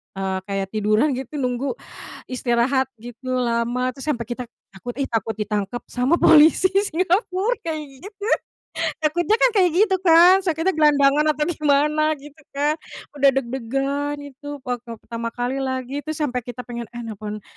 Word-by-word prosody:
eee, 190 Hz, -1 st, -2 dB
kayak 195 Hz, -1 st, -2 dB
tiduran 215 Hz, +6 st, +2 dB
gitu 265 Hz, +3 st, -7 dB
nunggu 255 Hz, -, -1 dB, 0.5 s
istirahat 255 Hz, +1 st, +1 dB
gitu 245 Hz, +3 st, -8 dB
lama, 240 Hz, +1 st, 0 dB
terus 270 Hz, -, -9 dB
sampai 235 Hz, -5 st, -2 dB
kita 240 Hz, +2 st, -4 dB, 0.3 s
takut 245 Hz, +6 st, -6 dB
"Ih, 275 Hz, -, -1 dB
takut 225 Hz, -1 st, -1 dB
ditangkap 210 Hz, +2 st, -3 dB
sama 255 Hz, +7 st, +1 dB
polisi 320 Hz, +4 st, +6 dB
Singapura." 380 Hz, +3 st, +1 dB
kayak 320 Hz, -2 st, -2 dB, 0.2 s
gitu. 410 Hz, 0 st, -11 dB, 0.8 s
Takutnya 340 Hz, +6 st, +2 dB
kan -, -, +6 dB
kayak 365 Hz, -2 st, +5 dB
gitu 385 Hz, +1 st, +4 dB
kan, 355 Hz, +1 st, +7 dB
takutnya 330 Hz, +2 st, +1 dB
gelandangan 295 Hz, -1 st, +4 dB
atau 300 Hz, -, 0 dB
gimana 305 Hz, 0 st, +2 dB
gitu 295 Hz, +1 st, -14 dB, 0.2 s
kan. 295 Hz, +3 st, +1 dB, 0.4 s
Udah 275 Hz, 0 st, +6 dB
deg-degan 270 Hz, +3 st, -2 dB
itu 285 Hz, 0 st, -12 dB, 0.2 s
waktu 245 Hz, -2 st, -5 dB
pertama 230 Hz, 0 st, -4 dB
kali 245 Hz, +2 st, -2 dB
lagi, 260 Hz, 0 st, -3 dB
itu 310 Hz, +1 st, -5 dB
sampai 280 Hz, -5 st, -1 dB
kita 245 Hz, 0 st, -6 dB
pengen, 235 Hz, 0 st, -6 dB
"Eh 240 Hz, -, -5 dB
nelpon 215 Hz, -1 st, -6 dB
270 Hz, 150 wpm, -22 LUFS, 240-310 Hz, 0.8 s, kan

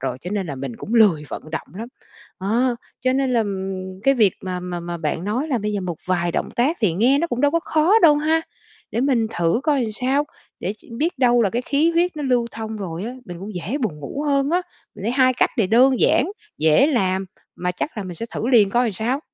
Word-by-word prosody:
rồi, 130 Hz, -1 st, -3 dB
cho 180 Hz, -, -6 dB
nên 200 Hz, -2 st, -2 dB
là 145 Hz, -, -4 dB
mình 130 Hz, -2 st, -5 dB
cũng 225 Hz, -, -5 dB
lười 200 Hz, -10 st, +5 dB
vận -, -, -6 dB
động 160 Hz, -, -5 dB
lắm. 225 Hz, +4 st, -6 dB, 0.5 s
Đó, 235 Hz, +6 st, +1 dB, 0.2 s
cho 255 Hz, +1 st, +1 dB
nên 265 Hz, -1 st, +1 dB
là, 235 Hz, -, +3 dB
ừm, 190 Hz, -2 st, -4 dB
cái 275 Hz, +3 st, +4 dB
việc 215 Hz, -7 st, +4 dB
mà 180 Hz, -1 st, -4 dB
mà 180 Hz, -1 st, -5 dB
mà 170 Hz, 0 st, -5 dB
bạn 160 Hz, +2 st, -3 dB
nói 250 Hz, +10 st, -1 dB
là 255 Hz, -, +1 dB
bây 210 Hz, 0 st, -2 dB
giờ 205 Hz, -, -1 dB
một 180 Hz, -3 st, -4 dB
vài 175 Hz, -2 st, 0 dB
động -, -, -1 dB
tác 275 Hz, +8 st, +2 dB
thì 210 Hz, -7 st, +2 dB
nghe 240 Hz, +11 st, +3 dB
nó 335 Hz, -, +1 dB
cũng 245 Hz, -7 st, -3 dB
đâu 290 Hz, +1 st, +4 dB
có 335 Hz, +2 st, +1 dB
khó 330 Hz, +8 st, +3 dB
đâu 310 Hz, -3 st, +8 dB
ha. 315 Hz, +2 st, +2 dB, 0.5 s
Để 235 Hz, -, -1 dB
mình 250 Hz, -4 st, +2 dB
thử 170 Hz, +7 st, +2 dB
coi 295 Hz, -4 st, +2 dB
làm 220 Hz, -2 st, -3 dB
sao, 265 Hz, +6 st, 0 dB, 0.4 s
để 195 Hz, -, -2 dB, 0.3 s
biết 320 Hz, -1 st, -1 dB
đâu 245 Hz, -2 st, +4 dB
là 200 Hz, -, +2 dB
cái 240 Hz, +4 st, -1 dB
khí 295 Hz, +6 st, +2 dB
huyết 345 Hz, 0 st, +1 dB
nó 300 Hz, -, -4 dB
lưu 250 Hz, -3 st, +1 dB
thông 220 Hz, -1 st, -6 dB
rồi 185 Hz, -3 st, -5 dB
á, 235 Hz, -, -4 dB
mình 175 Hz, -1 st, -8 dB
cũng 205 Hz, +2 st, -7 dB
dễ 185 Hz, -, -3 dB
buồn 200 Hz, -, -2 dB
ngủ 275 Hz, -, -5 dB
hơn 280 Hz, 0 st, +2 dB
á. 360 Hz, +2 st, +2 dB, 0.3 s
Mình -, -, -10 dB
thấy 230 Hz, +4 st, -1 dB
hai 255 Hz, -1 st, +4 dB
cách -, -, +2 dB
này 215 Hz, -, +3 dB
đơn 250 Hz, +5 st, +4 dB
giản, 300 Hz, +9 st, +3 dB, 0.3 s
dễ 160 Hz, -, +5 dB
làm, 190 Hz, -9 st, 0 dB, 0.3 s
mà 180 Hz, 0 st, -1 dB
chắc 265 Hz, -, -4 dB
là 210 Hz, -, -3 dB
mình 185 Hz, -2 st, -7 dB
sẽ 230 Hz, -, -5 dB
thử -, -, -2 dB
liền 220 Hz, -6 st, +5 dB
coi 240 Hz, +4 st, +2 dB
làm 225 Hz, -, -1 dB
sao. 235 Hz, +8 st, -1 dB
225 Hz, 255 wpm, -21 LUFS, 185-270 Hz, 0.5 s, đâu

